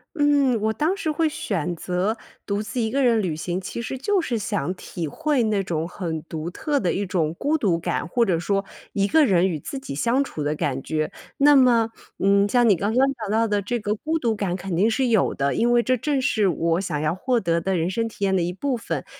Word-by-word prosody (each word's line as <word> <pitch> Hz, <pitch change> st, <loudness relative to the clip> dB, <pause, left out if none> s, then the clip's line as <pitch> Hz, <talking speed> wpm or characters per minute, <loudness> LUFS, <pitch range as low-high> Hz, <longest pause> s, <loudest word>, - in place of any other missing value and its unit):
嗯， 285 Hz, -6 st, +3 dB
我 220 Hz, +1 st, +1 dB
当 320 Hz, -, 0 dB
时 320 Hz, -, -2 dB
会 315 Hz, +1 st, +1 dB
选 180 Hz, -, -2 dB
择 180 Hz, +6 st, -1 dB, 0.3 s
独 200 Hz, 0 st, -1 dB
自 225 Hz, +3 st, -3 dB
一 220 Hz, -, -1 dB
个 275 Hz, +3 st, +1 dB
人 235 Hz, -4 st, +3 dB
旅 180 Hz, -5 st, -1 dB
行， 175 Hz, +4 st, -3 dB
其 235 Hz, -, -5 dB
实 265 Hz, +3 st, -4 dB
就 390 Hz, +10 st, +1 dB
是 255 Hz, -9 st, -1 dB
想 180 Hz, -5 st, -2 dB
体 170 Hz, -2 st, -5 dB
会 295 Hz, -, 0 dB
那 210 Hz, -3 st, +1 dB
种 165 Hz, -3 st, -2 dB
很 165 Hz, -4 st, -4 dB
独 160 Hz, 0 st, -5 dB
特 290 Hz, -, -1 dB
的 180 Hz, -, +1 dB
一 200 Hz, -, -1 dB
种 165 Hz, -4 st, 0 dB
孤 300 Hz, +3 st, +1 dB
独 185 Hz, -, +1 dB
感， 170 Hz, -, -2 dB
或 235 Hz, +8 st, +1 dB
者 180 Hz, -5 st, +1 dB
说 195 Hz, +4 st, -1 dB, 0.3 s
一 200 Hz, -1 st, +1 dB
个 315 Hz, +5 st, +4 dB
人 185 Hz, -5 st, +3 dB
与 170 Hz, -4 st, -2 dB
自 270 Hz, -, -6 dB
己 265 Hz, -, -7 dB
相 235 Hz, -, +2 dB
处 160 Hz, -, -4 dB
的 150 Hz, +1 st, 0 dB
感 135 Hz, -3 st, -2 dB
觉。 155 Hz, -1 st, -2 dB, 0.2 s
那 290 Hz, +1 st, +6 dB
么， 235 Hz, -4 st, +4 dB, 0.3 s
嗯， 200 Hz, +1 st, +4 dB
像 240 Hz, 0 st, +4 dB
你 200 Hz, -, +6 dB
刚 200 Hz, +5 st, -1 dB
刚 260 Hz, +3 st, +4 dB
讲 215 Hz, -5 st, -6 dB
到 225 Hz, +1 st, +2 dB
的 205 Hz, -1 st, 0 dB
这 240 Hz, +5 st, -2 dB
个 210 Hz, 0 st, -1 dB
孤 320 Hz, +8 st, -2 dB
独 230 Hz, -6 st, 0 dB
感 200 Hz, -4 st, -2 dB
肯 190 Hz, -1 st, -4 dB
定 205 Hz, +7 st, +3 dB
是 255 Hz, +3 st, +1 dB
有 225 Hz, -4 st, +2 dB
的， 140 Hz, -1 st, 0 dB
因 240 Hz, +1 st, +2 dB
为 240 Hz, 0 st, +5 dB
这 255 Hz, +1 st, +1 dB
正 275 Hz, +3 st, -1 dB
是 215 Hz, -6 st, +2 dB
我 165 Hz, +1 st, 0 dB
想 165 Hz, -6 st, -2 dB
要 155 Hz, +3 st, 0 dB
获 250 Hz, +5 st, 0 dB
得 170 Hz, -5 st, 0 dB
的 190 Hz, 0 st, 0 dB
人 165 Hz, +1 st, 0 dB
生 225 Hz, +4 st, -1 dB
体 205 Hz, -, -3 dB
验 190 Hz, -1 st, +2 dB
的 185 Hz, -, +2 dB
一 170 Hz, +1 st, -1 dB
部 265 Hz, +8 st, -2 dB
分。 230 Hz, -, -4 dB
205 Hz, 265 characters per minute, -23 LUFS, 175-250 Hz, 0.3 s, 那